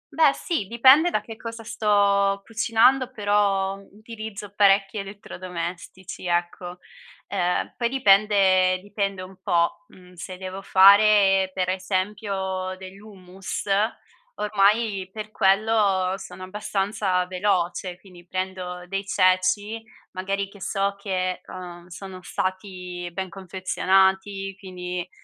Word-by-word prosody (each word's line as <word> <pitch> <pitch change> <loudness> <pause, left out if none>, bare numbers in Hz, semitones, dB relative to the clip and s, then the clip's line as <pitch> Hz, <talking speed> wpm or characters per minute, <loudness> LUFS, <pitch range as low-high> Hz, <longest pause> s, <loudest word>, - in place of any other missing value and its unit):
Beh, 315 -3 +5
sì, 315 - -3
dipende 260 - +6
da - - 0
che 225 - -10
cosa 230 0 -8
sto 200 -3 +2
cucinando, 240 +3 +3
però 205 -3 +1
utilizzo 215 -2 -9
parecchi 195 0 +3
elettrodomestici 185 -2 -7
ecco, 175 +1 -2 0.5
ehm, 180 -2 -1
poi 235 -1 0
dipende 195 -6 +4
dipende 200 -1 -3
un 190 +1 -11
po', 175 +3 0
uhm, 180 -1 -18
se 180 +1 -8
devo 190 +1 -7
fare 195 0 +6
per 185 -1 -2
esempio 190 0 -2
dell'hummus, 190 -1 -8 0.7
ormai 205 -1 +1
per 215 +1 -7
quello 195 -2 +2
sono 185 -1 -10
abbastanza 195 -1 -1
veloce, 180 -1 -1
quindi 180 -3 -16
prendo 185 -1 -4
dei 195 +1 -4
ceci 185 +4 +2 0.3
magari 195 +1 -3
che 200 0 -16
so 195 +1 -1
che, 185 -2 -2
uhm, 175 -1 -9
sono 185 +1 -9
stati 180 -1 -4
ben 190 +1 -4
confezionati, 190 +1 0
quindi, 180 -2 -6
195 Hz, 110 wpm, -24 LUFS, 185-205 Hz, 0.7 s, dipende